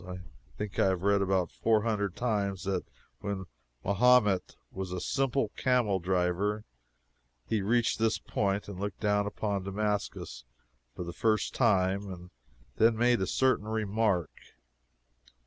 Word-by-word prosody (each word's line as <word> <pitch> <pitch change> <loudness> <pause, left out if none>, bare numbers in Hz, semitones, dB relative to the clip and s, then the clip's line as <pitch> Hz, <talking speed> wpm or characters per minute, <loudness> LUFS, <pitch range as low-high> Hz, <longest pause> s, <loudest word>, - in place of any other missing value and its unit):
I 90 0 -7 0.4
think 105 -2 -4
I - - +5
have 95 -1 0
read 100 0 +3
about 95 -3 +1
four 110 -2 +2
hundred 105 -4 -1
times 100 -6 -1
that 95 -1 -1 0.4
when 100 -2 -4 0.4
Mahomet 105 -2 +3 0.2
was 95 -1 -5
a 90 - -3
simple 135 0 0
camel 120 -6 +1
driver 95 +4 0 0.8
he 110 -2 0
reached 115 +3 +1
this 110 0 +2
point 100 0 -1
and 100 -3 -7
looked 100 0 -4
down 105 -1 +2
upon 100 -1 -2
Damascus 105 +1 -3 0.5
for - - -4
the 85 0 -6
first 110 +2 +1
time, 95 0 +2
and 90 -1 -10 0.5
then 115 0 +4
made 120 -2 +3
a 95 - 0
certain 130 -5 +2
renowned 110 -2 -2
remark. 100 -8 +1
100 Hz, 145 wpm, -30 LUFS, 95-110 Hz, 0.8 s, I